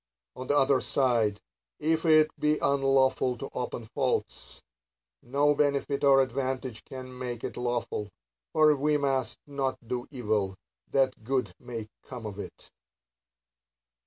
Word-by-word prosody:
On 130 0 -7
the 145 - +3
other 135 -1 +4
side, 115 -6 +1 0.4
if 160 +2 +1
it 155 -1 +6
be 150 0 +2
unlawful 135 -2 +2
to 135 - -6
open 120 -2 -4
faults, 130 +3 -2 0.6
no 145 +4 +2
benefit 140 -1 0
or 135 -1 +7
advantage 130 -3 -3
can 130 -1 -8
make 125 -2 -5
it - - -4
lawful; 120 -4 -2 0.4
for 155 -1 +5
we 150 +2 +2
must 135 -3 0
not 140 -2 -2
do 125 +1 -3
evil, 105 -7 -1 0.3
that 130 -4 +1
good 125 -5 -1
may 115 -3 -6
come 125 -4 -9
o 105 - -3
it. - - -9
130 Hz, 130 wpm, -28 LUFS, 120-140 Hz, 0.6 s, or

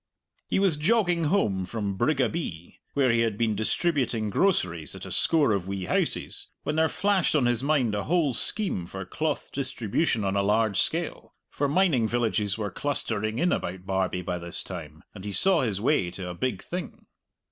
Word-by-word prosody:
He - - 0
was 190 -6 +2
jogging 175 -1 +2
home 110 - +1
from 100 0 -3
Brigabee, 130 - -1 0.2
where 135 -3 +4
he 115 - +2
had 115 -3 +1
been 115 -1 +1
distributing 115 - 0
groceries 90 - +1
at - - -8
a - - -7
score 150 -7 +3
of 95 -3 -1
wee 95 -1 -3
houses, - - -1 0.2
when 150 - -1
there 160 0 +4
flashed 185 +1 +1
on 140 -5 +3
his 120 0 +1
mind 140 -7 +2
a 100 -1 -2
whole 160 -5 +2
scheme 115 - -2
for 95 +1 -6
cloth 155 +9 -2
distribution 130 -2 0
on 95 0 0
a 100 - +3
large 105 0 +2
scale; - - -2 0.2
for 145 - 0
mining 145 -8 +3
villages 110 -4 0
were 105 -3 -3
clustering 110 -4 -2
in 175 +6 +2
about 90 +1 -3
Barbie 95 -1 -1
by 90 0 -3
this 85 +1 -4
time, 80 -5 -8
and 95 - -10
he 105 - -4
saw 185 - +4
his 105 -6 -1
way 115 -5 +2
to 90 0 -6
a - - -4
big 95 +2 -2
thing. 180 +1 -6
115 Hz, 185 wpm, -27 LUFS, 95-155 Hz, 0.2 s, where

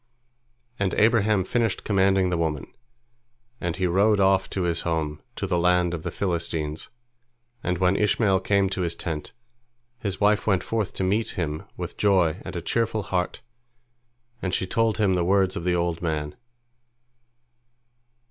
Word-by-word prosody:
And 100 -2 0
Abraham 110 -3 +3
finished 115 +3 0
commanding 95 -2 +2
the 90 - +1
woman, 80 -4 -1 0.9
and 85 -1 -2
he 95 -1 -1
rode 100 +4 +3
off 95 0 +3
to 95 - -2
his 85 -2 0
home, 80 -3 -2
to - - -3
the 90 -2 0
land 90 0 +2
of 85 - -4
the 85 - -4
Philistines, 80 -4 -2 0.7
and 90 -3 -1
when 90 +1 +2
Ishmael 100 -1 +2
came 100 0 +2
to 95 - -2
his 85 -1 -1
tent, 80 -3 -5 0.7
his 100 -5 -3
wife 105 +1 +2
went 95 -3 +2
forth 110 -4 -2
to - - -2
meet 105 +4 0
him 80 -3 -3
with - - -6
joy 95 -3 +2
and - - -7
a 85 - -4
cheerful 110 -1 0
heart, 90 -2 -2 1.0
and 95 - -1
she - - -1
told 115 +3 +1
him 105 -4 +2
the 90 -1 +1
words 95 +1 +2
of 85 - -4
the 90 -1 +2
old 85 -1 -1
man. 75 -3 -2
95 Hz, 160 wpm, -25 LUFS, 85-100 Hz, 1.0 s, Abraham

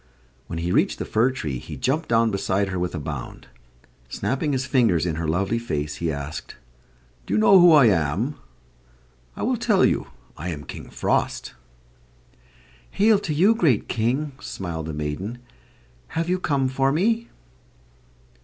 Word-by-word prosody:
When 85 - -5
he 85 +2 -2
reached - - +2
the - - -4
fir 115 +4 +2
tree 75 - -4
he - - -8
jumped 155 +5 -1
down 115 -1 +3
beside 100 0 0
her 95 -1 -3
with 90 0 -2
a - - -3
bound. 70 -3 -7 0.6
Snapping 130 - -1
his 130 -1 -1
fingers 115 - +2
in 80 -3 -2
her 85 -1 -2
lovely 100 +8 0
face, 75 -10 -3
he 85 -2 -1
asked: 70 +1 -6 0.7
"Do 100 - 0
you - - +3
know 110 - +7
who 175 -1 +8
I 150 -5 +7
am? 95 - +1 1.0
I - - -5
will - - +1
tell - - +3
you. - - 0 0.3
I 85 +4 -5
am 75 -4 -5
King - - -9
Frost." - - -1 1.4
"Hail 210 0 +3
to 175 - -4
you, 185 +9 +4
great 160 - +2
King!" 130 +7 -1
smiled 80 -4 -5
the 80 - -4
maiden. 75 +10 -4 0.7
"Have 165 +1 -2
you 185 +1 +1
come 140 -6 +1
for 135 +1 +1
me?" 225 +9 +1
110 Hz, 165 wpm, -23 LUFS, -, 1.4 s, who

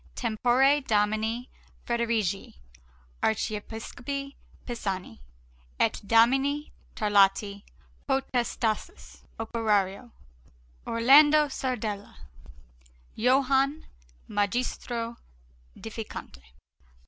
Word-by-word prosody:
TEMPORE 250 +5 +3
DOMINI 220 +1 0 0.4
FREDERIGI 230 -2 -1 0.7
ARCHIEPISCOPI 225 +6 -3 0.3
PISANI, 195 - -4 0.6
ET - - +1
DOMINI 270 +7 +3 0.2
TARLATI 200 -1 +2 0.4
POTESTATIS, 245 -4 -2
OPERARIO 220 -1 0 0.8
ORLANDO 290 +6 +6
SARDELLA, 220 -7 -4 1.0
JOHANNE 270 +4 +2 0.4
MAGISTRO 235 +2 -2 0.6
ÆDIFICANTE. 220 - -8
230 Hz, 55 wpm, -27 LUFS, 210-265 Hz, 1.0 s, ORLANDO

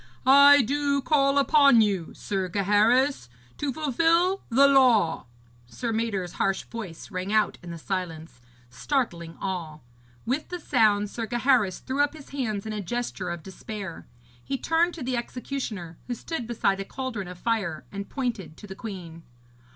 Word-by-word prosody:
'I 280 +1 +8
do 280 +3 0
call 275 -1 +2
upon 280 -3 +6
you, 200 -6 +1
Sir 190 -2 -3
Gaheris, 210 - +2 0.3
to 290 -2 -1
fulfil 330 +7 +2
the 275 +4 +6
law!' 240 - +4 0.4
Sir 230 - -4
Mador's 205 -6 -2
harsh 195 -1 +1
voice 215 -6 -8
rang 185 +1 -3
out 215 0 +2
in 175 - -10
the 170 - -6
silence, 165 -6 -5 0.3
startling 170 - -2
all. 165 -5 -5 0.4
With 265 +6 -2
the 355 - -5
sound, 215 -8 +2
Sir 230 -2 -4
Gaheris 240 -5 +2
threw 265 +2 -4
up 290 0 +1
his 305 -3 -12
hands 220 -8 -3
in 220 - -4
a 210 - -3
gesture 200 -2 -4
of 170 -2 -5
despair. 195 -2 -8 0.4
He 270 - -3
turned 330 +5 +1
to 315 - -6
the 250 0 -1
executioner, 235 -9 -5
who 245 - -2
stood 245 -1 -5
beside 200 -4 0
a - - -2
cauldron 235 -5 -5
of 180 0 -9
fire, 195 -7 -2
and 200 0 -6
pointed 235 - -4
to - - -11
the 195 - -8
queen. 185 -6 -8
225 Hz, 160 wpm, -26 LUFS, 190-270 Hz, 0.4 s, I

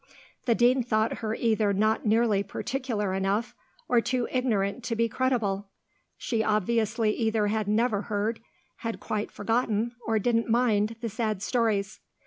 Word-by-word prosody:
The 235 - +3
Dean 250 +2 +4
thought 220 -2 0
her 220 -1 -2
either 220 -3 +1
not 215 +3 +1
nearly 220 -2 +3
particular 225 -3 -3
enough, 195 +4 0 0.3
or 240 -1 +4
too 250 0 -1
ignorant 225 -4 0
to 230 - -1
be 230 +1 +2
credible. 215 -6 -1 0.5
She 230 -3 -1
obviously 215 +1 +1
either 220 -2 +1
had 215 -1 -1
never 215 0 +2
heard, 210 +2 -2 0.4
had 230 -1 -4
quite 210 -1 -3
forgotten, 225 +1 0
or 225 -1 +2
didn't 230 +2 +1
mind, 225 -2 +2
the 230 - -2
sad 215 -2 -2
stories. 215 -4 0
220 Hz, 145 wpm, -27 LUFS, 210-235 Hz, 0.5 s, Dean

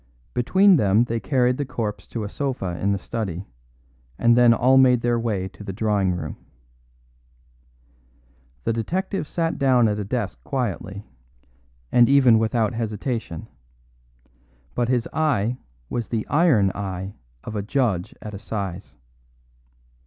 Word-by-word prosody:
Between 185 +10 +4
them 105 -1 +3
they 115 -1 -2
carried 125 -1 +1
the 145 - -1
corpse 115 -6 -4
to 115 - -4
a - - -3
sofa 115 -7 -3
in 100 - +1
the 100 - +1
study, 95 -3 -4 0.7
and 120 0 +4
then 120 -1 +6
all 125 +3 +4
made 125 -2 +5
their 120 0 +1
way 105 -5 -1
to 105 - -13
the 100 - -5
drawing 100 -2 0
room. 90 - -5 2.3
The 115 - 0
detective 180 - -2
sat 165 -1 -2
down 130 -4 +4
at 105 0 -1
a - - -2
desk 105 0 -3
quietly, 105 -5 -3 0.9
and 120 0 +5
even 130 -5 +6
without 110 +1 +1
hesitation; 110 - -4 1.3
but 120 -1 0
his 125 -2 +1
eye 125 -7 0 0.3
was 120 - -3
the 110 -2 -3
iron 145 - +4
eye 95 -1 -5 0.3
of 110 - -6
a 105 - -1
judge 105 -5 -1
at 105 - -7
assize. 100 -2 -5
115 Hz, 140 wpm, -23 LUFS, 100-125 Hz, 2.3 s, then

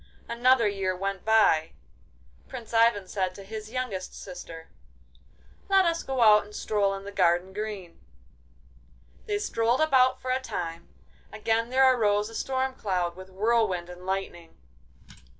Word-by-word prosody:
Another 240 0 +3
year 195 -2 -1
went 195 0 -3
by. 215 -8 +3 0.7
Prince 240 -3 -9
Ivan 225 -4 +3
said 185 -1 -2
to 200 - -10
his 215 +2 -8
youngest 230 -7 -5
sister: 165 -3 -10 1.0
'Let 385 -1 +5
us 335 -1 0
go 265 -2 -2
out 210 -2 +7
and 210 +1 -14
stroll 200 -2 0
in 195 - -8
the 200 - -8
garden 180 -1 +1
green!' 205 -4 -6 1.3
They 415 -1 0
strolled 240 - 0
about 260 -4 +3
for 255 - -3
a 260 - +1
time. 170 -8 -5 0.4
Again 225 +2 -1
there 265 +1 +4
arose 210 -2 +1
a 225 - -11
storm 265 +1 -1
cloud, 180 -7 -2
with 185 +1 -11
whirlwind 195 -3 0
and 180 0 -12
lightning. 185 -3 -5
210 Hz, 145 wpm, -27 LUFS, 185-240 Hz, 1.3 s, out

